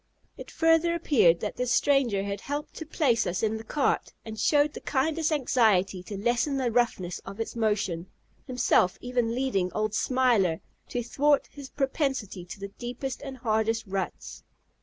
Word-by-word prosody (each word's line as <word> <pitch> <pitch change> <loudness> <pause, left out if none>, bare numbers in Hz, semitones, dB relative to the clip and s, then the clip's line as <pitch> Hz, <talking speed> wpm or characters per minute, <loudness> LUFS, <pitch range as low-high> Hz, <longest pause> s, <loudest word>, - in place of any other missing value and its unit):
It - - -10
further 325 +1 +3
appeared 215 - +3
that 210 - -4
this 250 0 -1
stranger 250 -10 +2
had 200 0 -4
helped 290 +1 -4
to 320 - -7
place 260 -8 +1
us 180 +3 -2
in 220 0 +1
the 220 - -8
cart, 275 +5 0
and 220 -1 -7
showed 290 +5 +3
the - - -8
kindest 315 +3 0
anxiety 220 -10 +2
to 195 +2 -7
lessen 240 +6 0
the 255 -3 0
roughness 220 -7 0
of 195 +2 -10
its 225 - -4
motion, 205 -6 -1 0.4
himself 250 -7 +2
even 245 -2 -1
leading 220 -9 0
old 215 0 -1
"Smiler," 230 -10 +2 0.3
to 245 - -2
thwart 285 +5 +2
his 280 -2 -10
propensity 265 - -2
to 180 - -9
the 200 0 -6
deepest 250 +2 -5
and 270 -2 -7
hardest 225 -1 0
ruts. 195 -2 -5
240 Hz, 165 wpm, -27 LUFS, 200-275 Hz, 0.4 s, further